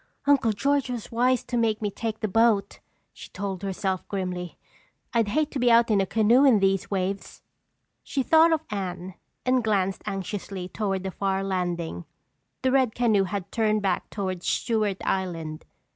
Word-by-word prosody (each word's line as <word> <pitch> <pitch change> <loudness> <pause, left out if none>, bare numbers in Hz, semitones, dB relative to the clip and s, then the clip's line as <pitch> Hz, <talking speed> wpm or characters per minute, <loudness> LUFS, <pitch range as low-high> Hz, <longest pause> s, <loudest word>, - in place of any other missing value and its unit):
"Uncle 270 -5 +4
George 280 +5 0
was 240 -3 -5
wise 245 +1 +2
to 245 - -5
make 225 -2 +1
me 210 -2 -2
take 220 +1 -4
the 215 - 0
boat," 215 -1 +2 0.3
she - - -11
told 195 -2 -5
herself 190 -1 -2
grimly. 180 -3 -4 0.6
"I'd 230 -3 +2
hate 305 +8 0
to 275 - -3
be 245 -1 +3
out 230 0 +5
in 200 -2 +4
a 195 - -1
canoe 225 +6 +4
in 260 -6 +6
these 195 -1 +1
waves." 195 0 -3 0.6
She 280 -2 -2
thought 325 +4 +5
of 320 -1 +1
Anne 185 -2 -4 0.3
and 255 -1 +2
glanced 195 -3 0
anxiously 195 -1 -4
toward 195 -2 -2
the 190 - -3
far 195 0 -1
landing. 175 - -3 0.6
The 260 - +3
red 260 -4 +2
canoe 220 -5 +3
had 195 0 -5
turned 215 -2 +1
back 190 -2 -1
toward 185 -3 -3
Stewart 210 +1 0
Island. 165 -5 -3
205 Hz, 170 wpm, -26 LUFS, 190-235 Hz, 0.6 s, in